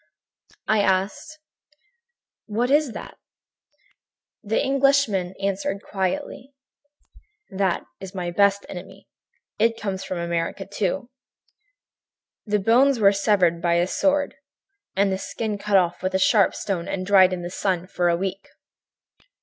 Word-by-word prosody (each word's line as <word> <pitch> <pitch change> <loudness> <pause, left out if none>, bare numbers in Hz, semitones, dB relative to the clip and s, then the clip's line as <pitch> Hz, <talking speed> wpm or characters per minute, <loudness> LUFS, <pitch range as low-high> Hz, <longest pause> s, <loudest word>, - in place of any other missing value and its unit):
"I 215 - +3
asked: 195 +10 -1 1.1
"'What 235 +4 -1
is 290 -4 +3
that?' - - -9 1.2
"The 215 +2 0
Englishman 270 -9 +2
answered 195 0 -2
quietly: 255 +7 -4 1.0
"'That 190 -2 0 0.2
is 190 0 -9
my 175 -2 -3
best 200 +2 +2
enemy. 190 +1 -10 0.5
It 230 +1 +2
comes 195 -2 -3
from 185 - -4
America, 170 +2 -2
too. 200 +5 -3 1.4
The 210 0 +2
bones 240 +6 +3
were 200 -1 +5
severed 195 -4 +2
by 170 0 +2
a 170 +1 +3
sword 285 +9 +1 0.6
and 195 0 +2
the 190 - -2
skin 210 +1 -4
cut 205 -1 +2
off 175 -2 +1
with 185 +1 -2
a - - +5
sharp 200 +1 +3
stone 180 -4 -3
and 185 -1 -3
dried 190 -1 +6
in 180 -1 -4
the 175 - -5
sun 185 -2 -1
for 175 -1 0
a 170 - +3
week.' 195 +1 -4
195 Hz, 135 wpm, -23 LUFS, 185-215 Hz, 1.4 s, dried